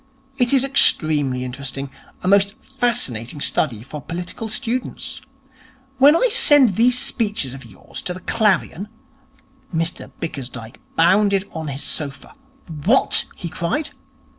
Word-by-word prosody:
It 245 -1 +2
is 270 -2 +4
extremely 150 - +3
interesting. 135 +1 -6 0.3
A - - -3
most 200 +1 +3
fascinating 185 - -2
study 120 -6 0
for 145 +3 -8
political 180 +8 -6
students. 240 +3 -4 0.8
When 285 +4 +7
I - - +3
send 290 - +6
these 240 +6 +3
speeches 210 - -1
of 135 -2 -11
yours 100 -5 -10
to 180 - -3
the 185 - -10
Clarion 205 -2 0 0.4
' 270 -6 -17
Mr 165 +1 -3
Bickersdyke 125 -7 -7 0.2
bounded 195 +3 +3
on 160 -1 -6
his 140 0 -4
sofa. 140 -3 -3 0.5
'What!' 245 +7 +4
he 175 - -6
cried. 175 - -3
180 Hz, 130 wpm, -20 LUFS, -, 0.8 s, When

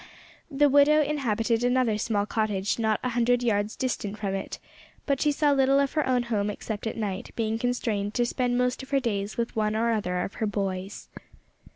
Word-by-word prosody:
The 290 0 +3
widow 285 +2 +5
inhabited 235 -5 0
another 245 -3 +2
small 205 -2 0
cottage 210 -1 -1
not 220 -2 +1
a 250 - 0
hundred 245 +1 +2
yards 210 -2 0
distant 215 -5 -3
from 200 -2 -3
it, 195 0 -4 0.5
but 280 -2 0
she 300 - +3
saw 290 0 +2
little 275 0 +4
of 280 -1 0
her 305 -3 0
own 250 -1 +2
home 210 -3 -1
except 210 +1 -5
at 220 - -4
night, 200 -4 -3
being 225 -1 -1
constrained 225 -4 -1
to 240 - +2
spend 245 0 0
most 250 +1 0
of 265 - -11
her 275 - +2
days 205 -5 -3
with 235 0 -2
one 215 -1 0
or 230 +1 +1
other 180 -5 -1
of - - -5
her 220 - +2
"boys." 195 -1 -4
230 Hz, 200 wpm, -26 LUFS, 205-255 Hz, 0.5 s, widow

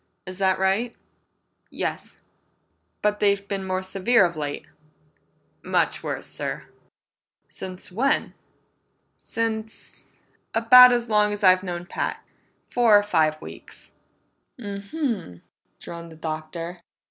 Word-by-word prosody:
Is 185 +1 -8
that 190 -1 +2
right?" 195 +5 0 0.7
"Yes." - - -5 0.8
"But 210 0 +1
they've 200 -1 +2
been 195 -1 -3
more 185 0 -2
severe 195 +3 +3
of 170 -1 -3
late?" 145 -2 -4 1.0
"Much - - 0
worse, - - -4
sir!" - - -4 0.9
"Since 185 0 -8
when?" 245 +9 +1 0.9
"Since 220 -1 -5 0.4
about 250 +2 +9
as 240 -1 0
long 210 -1 +3
as 205 0 -5
I've 185 -1 +6
known 175 -2 -5
Pat. - - -4 0.4
Four 230 -4 +5
or 205 - +2
five 160 -6 +1
weeks." - - -11 0.7
"M 200 -3 -6
m," 230 - -3 0.4
droned 170 -1 -9
the - - -12
Doctor. 160 +2 -6
195 Hz, 115 wpm, -24 LUFS, 175-220 Hz, 1.0 s, about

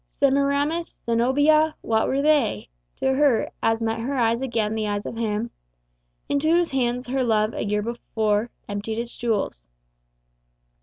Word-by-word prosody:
Semiramis? 280 +4 0
Zenobia? 290 +7 +3
What 220 -1 +1
were 275 +1 0
they 285 - +2 0.3
To 265 - 0
her, 275 -4 +2
as 225 0 +1
met 225 0 -1
her 265 +5 -2
eyes 230 0 +2
again 225 -5 -1
the 220 -1 -1
eyes 205 0 -2
of - - -5
him 225 0 -2 0.8
Into 285 +2 +1
whose 345 +1 +3
hands 250 -1 0
her 260 +1 -1
love 215 -2 +1
a - - -3
year 210 0 0
before 220 -1 -1 0.2
Emptied 205 +2 -4
its 235 0 -5
jewels! 210 - -2
235 Hz, 150 wpm, -24 LUFS, 220-280 Hz, 0.8 s, Zenobia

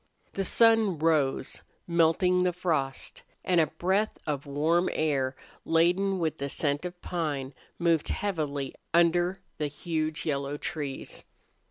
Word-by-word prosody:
The 195 - -1
sun 225 -4 +4
rose, 150 -4 +1 0.2
melting 170 +2 +3
the 180 -1 +2
frost, 155 -7 -2 0.2
and 175 -2 +4
a 155 - +2
breath 190 +7 0
of 145 -2 -3
warm 160 +5 +2
air, 140 -4 0 0.3
laden 180 +4 +2
with 160 -4 -1
the 140 0 -2
scent 145 +3 -1
of 175 0 -6
pine, 145 -6 -2 0.2
moved 170 -3 +2
heavily 150 -9 -2 0.2
under 175 +2 +3 0.2
the 150 - 0
huge, 155 +1 -3
yellow 140 -1 -1
trees. 145 -4 -5
165 Hz, 130 wpm, -28 LUFS, 145-180 Hz, 0.3 s, sun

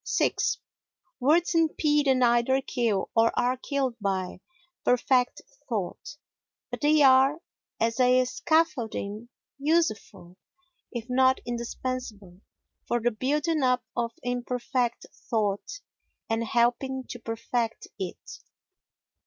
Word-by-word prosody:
vi - - +3 0.9
Words 320 +7 +3
impede 305 -3 +2
and 260 -1 +3
either 240 +2 +3
kill, 235 -7 -1
or 225 0 +4
are 250 +1 +2
killed 265 -1 -2
by, 190 -3 -2 0.4
perfect 250 +3 +2 0.3
thought; 220 +6 -4 0.5
but - - -5
they 300 0 +4
are, 265 +2 +6 0.4
as 230 +2 0
a 255 0 +4
scaffolding, 240 -8 -1 0.3
useful, 215 - -1 0.5
if 235 -1 -5
not 260 +1 +3
indispensable, 235 -5 -5 0.5
for 240 - +1
the 240 +1 +1
building 295 +7 0
up 250 -1 +2
of 235 -1 -1
imperfect 245 0 -2 0.2
thought 215 - -1 0.5
and 225 +1 0
helping 245 +3 +1
to 245 - -7
perfect 230 0 -3
it. 185 -2 -7
245 Hz, 105 wpm, -27 LUFS, 230-270 Hz, 0.9 s, are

